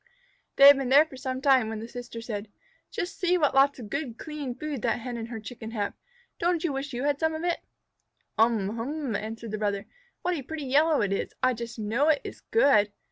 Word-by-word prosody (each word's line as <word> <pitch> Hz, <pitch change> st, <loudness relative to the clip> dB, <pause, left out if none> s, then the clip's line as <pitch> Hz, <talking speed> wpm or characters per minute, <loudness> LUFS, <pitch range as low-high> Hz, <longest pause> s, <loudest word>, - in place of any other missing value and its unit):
They 275 Hz, -, +7 dB
had 285 Hz, 0 st, +10 dB
been 265 Hz, -2 st, -2 dB
there 285 Hz, +4 st, +7 dB
for 315 Hz, -, -13 dB
some 260 Hz, 0 st, -4 dB
time, 265 Hz, -5 st, +4 dB
when 220 Hz, -1 st, -4 dB
the 225 Hz, -, -7 dB
sister 240 Hz, -1 st, -8 dB
said, 220 Hz, -2 st, -5 dB, 0.4 s
"Just 355 Hz, -, -5 dB
see 360 Hz, 0 st, +3 dB
what 300 Hz, -5 st, +2 dB
lots 275 Hz, +1 st, +4 dB
of 220 Hz, -5 st, -9 dB
good, 280 Hz, -5 st, -3 dB
clean 295 Hz, -5 st, -5 dB
food 290 Hz, -2 st, -4 dB
that 235 Hz, -, 0 dB
Hen 245 Hz, 0 st, -5 dB
and 230 Hz, -1 st, -5 dB
her 230 Hz, -2 st, -6 dB
Chickens 225 Hz, +1 st, -8 dB
have. 205 Hz, -3 st, -2 dB, 0.5 s
Don't 345 Hz, -1 st, +1 dB
you 330 Hz, -5 st, 0 dB
wish 275 Hz, +1 st, -4 dB
you 245 Hz, +1 st, -3 dB
had 290 Hz, 0 st, +1 dB
some 320 Hz, -1 st, +1 dB
of 315 Hz, -, -5 dB
it?" 345 Hz, -1 st, 0 dB, 0.8 s
"Um 220 Hz, -2 st, +2 dB
hum!" 270 Hz, 0 st, -3 dB
answered 220 Hz, +1 st, -5 dB
the 215 Hz, -, -3 dB
brother. 200 Hz, -2 st, -1 dB, 0.4 s
"What 360 Hz, -, +1 dB
a 315 Hz, -, -3 dB
pretty 300 Hz, +2 st, -6 dB
yellow 295 Hz, +3 st, +3 dB
it 200 Hz, -1 st, 0 dB
is. -, -, -3 dB
I 255 Hz, -, +4 dB
just 235 Hz, 0 st, -7 dB
know 225 Hz, +7 st, +1 dB
it 310 Hz, -3 st, +3 dB
is -, -, -8 dB
good!" 240 Hz, -, +3 dB
255 Hz, 230 wpm, -27 LUFS, 225-295 Hz, 0.8 s, had